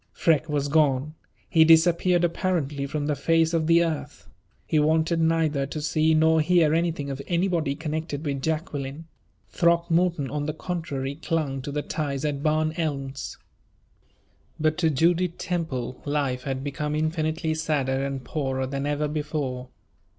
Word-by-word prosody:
Freke 160 -1 +2
was 145 -1 0
gone. 145 -1 +2 0.3
He 160 -3 +5
disappeared 170 +2 +4
apparently 165 -5 -1
from 150 0 -3
the 150 - +1
face 165 +3 +2
of 160 -2 +1
the 170 +1 +5
earth. 160 -3 -4 0.4
He 155 - +1
wanted 160 +2 +2
neither 160 -4 +1
to 155 - -5
see 155 +1 +2
nor 160 0 +4
hear 160 -1 +3
anything 165 -4 0
of 135 0 -5
anybody 170 -5 0
connected 155 -1 -4
with 140 -2 -2
Jacqueline. 155 -1 -3 0.4
Throckmorton, 170 -2 +2
on 145 0 -2
the 155 - -3
contrary, 155 -6 -4
clung 150 -5 -1
to 145 - -6
the 145 0 -2
ties 140 -2 -3
at 145 -2 -2
Barn 155 +1 +1
Elms. 140 -4 -3 1.2
But 155 +1 +1
to 165 -3 +3
Judith 170 +4 +1
Temple 145 -9 -3
life 140 -3 -1
had 135 -1 -3
become 150 +1 -3
infinitely 155 +1 -1
sadder 140 -4 0
and 135 -1 -3
poorer 135 -3 -2
than 140 +2 -3
ever 145 +1 0
before. 145 -4 -3
155 Hz, 150 wpm, -25 LUFS, 140-165 Hz, 1.2 s, He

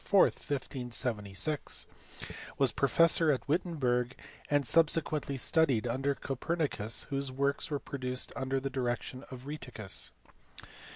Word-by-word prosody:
4, 200 -1 +5
1576, 125 -2 0 0.7
was 135 -3 +4
professor 165 +5 +4
at 135 - -2
Wittenberg, 135 -7 +1 0.3
and 145 -1 +3
subsequently 155 -1 +2
studied 130 -3 +3
under 135 +4 0
Copernicus 135 -6 -1
whose 135 -1 +1
works 140 +2 0
were 145 - 0
produced 130 -2 -4
under 130 0 0
the 135 +1 -3
direction 130 0 -2
of 130 -1 -9
Rheticus. 125 -9 -4
135 Hz, 110 wpm, -32 LUFS, 125-150 Hz, 0.7 s, 4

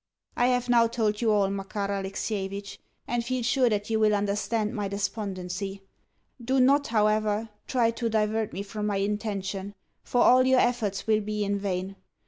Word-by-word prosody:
I 245 - +3
have 250 -1 +1
now 235 -1 +5
told 220 -2 -1
you 225 -2 +3
all, 205 -2 +3
Makar 200 +1 -3
Alexievitch, 200 0 -4 0.3
and 240 0 -1
feel 255 +1 -2
sure 245 +1 +3
that 210 0 -2
you 220 - +2
will 215 -1 +4
understand 210 +2 -1
my 205 -4 -2
despondency. 195 -1 -4 0.6
Do 260 +3 +1
not, 280 +3 +4
however, 215 0 +1 0.2
try 235 -3 +2
to 230 0 -2
divert 220 0 0
me 195 - -4
from 210 +1 -4
my 205 -1 0
intention, 200 -1 -3 0.3
for 245 - 0
all 255 +1 +6
your 260 -1 +5
efforts 220 -6 0
will 215 -1 +2
be 210 0 -2
in 200 0 -1
vain. 195 0 -3
210 Hz, 170 wpm, -27 LUFS, 200-230 Hz, 0.6 s, all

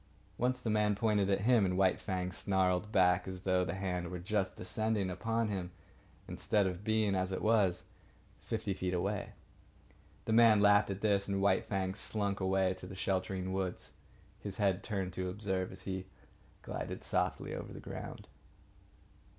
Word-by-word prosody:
Once, 125 +1 +1
the 120 - -3
man 105 -1 +2
pointed 105 -2 +2
at 100 0 +2
him, 120 0 +4
and 90 -1 +1
White 95 -1 +3
Fang 90 -2 -2
snarled 95 +1 0
back 90 -3 +3
as 95 0 -6
though 95 -1 +2
the 90 0 -3
hand 90 -2 -2
were 90 - -4
just 95 +2 -1
descending 110 -4 -1
upon 115 +5 -1
him 95 -3 -3 0.6
instead 105 -2 +1
of 90 +1 -3
being, 110 -2 +2
as 95 0 0
it 95 - -2
was, 100 -5 +2 0.6
fifty 110 -3 -3
feet 90 -1 -2
away. 100 +3 -2 0.9
The 110 - 0
man 115 -2 +7
laughed 100 0 +5
at 100 0 -4
this; 100 -2 +2
and 100 -1 0
White 95 -1 +3
Fang 95 -2 -1
slunk 100 -1 -2
away 95 -1 +2
to - - -8
the 95 - -8
sheltering 95 0 -1
woods, 95 -1 -3 0.5
his 100 -2 -6
head 100 -2 +2
turned 95 -4 -3
to 95 0 -2
observe 95 -1 -2
as - - -7
he 95 -1 -4 0.6
glided - - -5
softly - - -1
over - - -6
the - - -8
ground. - - -8
95 Hz, 170 wpm, -33 LUFS, 95-105 Hz, 0.9 s, man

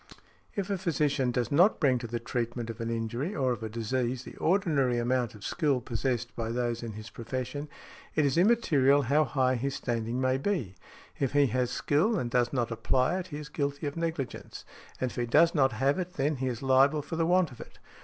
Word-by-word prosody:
If 200 0 -2
a 195 - -1
physician 150 -7 +1
does 125 +1 -1
not 175 +9 +4
bring 130 -5 +3
to 120 - -6
the 120 +1 -3
treatment 120 0 -3
of 115 +1 -9
an 115 - -2
injury 120 - -2
or 130 -3 +1
of 120 - -3
a 110 - -4
disease 120 +3 -2
the - - -11
ordinary 155 -9 +2
amount 120 -1 0
of 105 - -13
skill 145 - +1
possessed 120 0 -2
by 115 -1 -3
those 120 0 -1
in 115 -2 -5
his 110 +2 -9
profession, 130 +5 -5 0.5
it 155 - +3
is 135 - +1
immaterial 150 - +4
how 145 +4 +3
high 130 0 +1
his 135 +3 -2
standing 115 0 -2
may 130 0 +1
be; 140 - -1 0.5
if 135 -2 0
he 145 0 +5
has 125 0 0
skill 175 - +1
and 120 -8 -2
does 120 0 +2
not 120 -3 -1
apply 130 +9 +1
it 185 - -6
he 145 -5 -6
is 150 0 -7
guilty 145 0 -2
of 145 - -3
negligence, 165 -5 -4 0.3
and 130 -1 -1
if - - -12
he 120 -1 -1
does 165 +7 +5
not 135 -4 +3
have 135 +8 +1
it 180 0 -4
then 145 0 0
he 130 +1 -2
is 125 0 -4
liable 135 +3 +4
for 165 - -5
the 165 0 +1
want 180 -3 +3
of 125 - -11
it. - - -12
130 Hz, 220 wpm, -29 LUFS, 120-150 Hz, 0.5 s, he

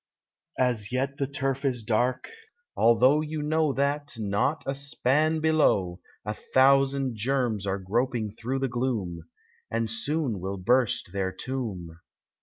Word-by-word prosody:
87 125 -1 +4
As 105 -2 -7
yet 135 +2 -1
the 140 -3 -1
turf 135 -1 -2
is 125 -4 -1
dark, 120 +4 0 0.5
although 125 +6 +5
you 155 0 -4
know 155 0 +2
That, 140 +1 -1
not 110 +8 0
a 135 - -1
span 140 +3 +1
below, 100 - +2 0.3
A 105 - -2
thousand 135 0 +3
germs 115 -4 0
are 95 0 0
groping 110 +3 -1
through 120 +5 -3
the 135 - +1
gloom, 110 -10 -3 0.4
And 115 -1 -1
soon 130 - -1
will 95 +2 -4
burst 120 -1 +1
their 95 -1 -1
tomb. 95 -10 -5
125 Hz, 140 wpm, -27 LUFS, 105-140 Hz, 0.5 s, although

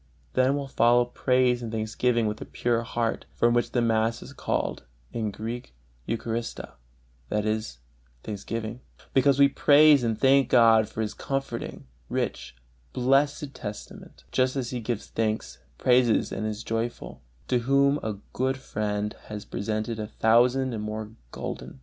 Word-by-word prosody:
Then 130 +2 +3
will 140 -1 -3
follow 120 -1 +4
praise 125 0 +2
and 115 -2 -5
thanksgiving 115 +2 0
with 105 0 -3
a - - -5
pure 120 -1 0
heart, 115 -1 -2
from 120 0 +3
which 120 0 +1
the 120 - +1
mass 115 0 +1
is 140 - -11
called - - -2 0.3
in 110 -2 -1
Greek 110 - -6 0.3
Eucharistia, 115 +1 -3 0.6
that 105 0 0
is, 110 - -2 0.5
"thanksgiving," 110 +2 -5 0.3
because 135 +1 +4
we 140 0 +7
praise 145 0 +6
and 115 -2 -1
thank 135 -1 +4
God 115 -3 +5
for 110 - -3
this 105 - -4
comforting, 135 -4 -4 0.2
rich, - - -3 0.4
blessed 140 +2 +1
testament, 105 - -9
just 130 +1 +1
as 130 -3 -2
he 125 - -3
gives 115 -1 -3
thanks, 110 - -2 0.2
praises 125 -2 +3
and 110 - -2
is 110 +1 -4
joyful, 115 +2 -4 0.3
to 125 - +2
whom 140 +3 +3
a 110 -2 -3 0.2
good 130 +1 0
friend 105 -4 -3
has 105 -1 -7
presented 110 +2 -3
a 105 - -3
thousand 120 +4 +3
and 110 - -3
more 110 0 -5 0.2
gulden. - - -6
115 Hz, 150 wpm, -26 LUFS, 110-130 Hz, 0.6 s, we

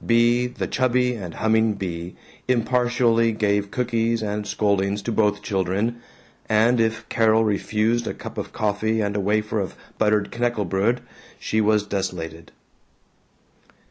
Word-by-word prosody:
Bea, 120 +1 +3
the 125 - -4
chubby 125 -1 +1
and 95 -7 -6
humming 110 -1 +2
Bea, 90 -3 -5 0.3
impartially 120 -1 +2
gave 100 -1 0
cookies 115 -1 0
and 105 0 -3
scoldings 100 -1 0
to 120 - -2
both 105 -2 +1
children, 100 +4 -1 0.5
and 115 +3 +3
if 110 0 0
Carol 110 -1 +3
refused 110 +3 0
a - - -2
cup - - -7
of - - -5
coffee 110 +1 0
and 100 -1 -1
a - - 0
wafer 105 +2 0
of 95 -3 -4 0.2
buttered 105 -1 +2
knackebrod, 115 -1 0 0.4
she 110 - 0
was 105 -1 +3
desolated. 85 -5 -4
110 Hz, 135 wpm, -23 LUFS, 100-115 Hz, 0.5 s, Bea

